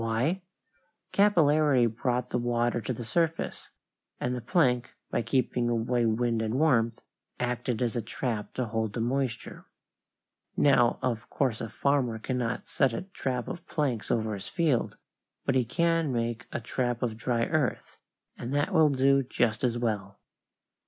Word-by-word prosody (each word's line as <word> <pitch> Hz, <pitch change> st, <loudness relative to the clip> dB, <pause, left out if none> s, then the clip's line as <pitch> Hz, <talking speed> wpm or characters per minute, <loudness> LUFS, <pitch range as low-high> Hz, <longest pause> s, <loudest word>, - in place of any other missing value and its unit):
Why? 125 Hz, +12 st, 0 dB, 0.7 s
Capillarity 155 Hz, -9 st, +4 dB
brought 125 Hz, +2 st, -1 dB
the 125 Hz, -, +1 dB
water 120 Hz, 0 st, 0 dB
to 105 Hz, -, -3 dB
the 120 Hz, -1 st, -4 dB
surface, 165 Hz, +7 st, -1 dB, 0.5 s
and 125 Hz, -, -1 dB
the 125 Hz, -, -3 dB
plank, 125 Hz, -3 st, +1 dB, 0.2 s
by -, -, +1 dB
keeping 125 Hz, -1 st, 0 dB
away 120 Hz, 0 st, +1 dB
wind 115 Hz, 0 st, +1 dB
and 110 Hz, +1 st, -1 dB
warmth, 120 Hz, -6 st, +2 dB, 0.4 s
acted 125 Hz, 0 st, -1 dB
as 120 Hz, -1 st, -1 dB
a 120 Hz, -, 0 dB
trap 115 Hz, -3 st, -4 dB
to 130 Hz, -, 0 dB
hold 110 Hz, -1 st, -2 dB
the -, -, -3 dB
moisture. 125 Hz, 0 st, -2 dB, 0.9 s
Now 120 Hz, -4 st, +4 dB
of 120 Hz, -2 st, -2 dB
course 130 Hz, -5 st, 0 dB
a 115 Hz, -, -4 dB
farmer 135 Hz, -4 st, +1 dB
cannot 125 Hz, 0 st, -2 dB
set 135 Hz, -5 st, +1 dB
a 115 Hz, -, -3 dB
trap 130 Hz, -, -3 dB
of 170 Hz, -, -7 dB
planks 130 Hz, -8 st, -1 dB
over 110 Hz, -2 st, 0 dB
his 100 Hz, -, -6 dB
fields, 150 Hz, -8 st, 0 dB, 0.5 s
but 135 Hz, -, +2 dB
he 130 Hz, -2 st, +2 dB
can 165 Hz, +4 st, +1 dB
make 120 Hz, -1 st, -2 dB
a -, -, -2 dB
trap 120 Hz, 0 st, -2 dB
of 115 Hz, -3 st, -1 dB
dry 115 Hz, +1 st, 0 dB
earth, 155 Hz, -5 st, -1 dB, 0.4 s
and 125 Hz, +4 st, -4 dB
that 145 Hz, +7 st, +1 dB
will 160 Hz, -3 st, +6 dB
do 135 Hz, 0 st, +4 dB
just 120 Hz, -3 st, 0 dB
as 120 Hz, -2 st, +1 dB
well. 105 Hz, -4 st, -2 dB
125 Hz, 160 wpm, -28 LUFS, 115-135 Hz, 0.9 s, will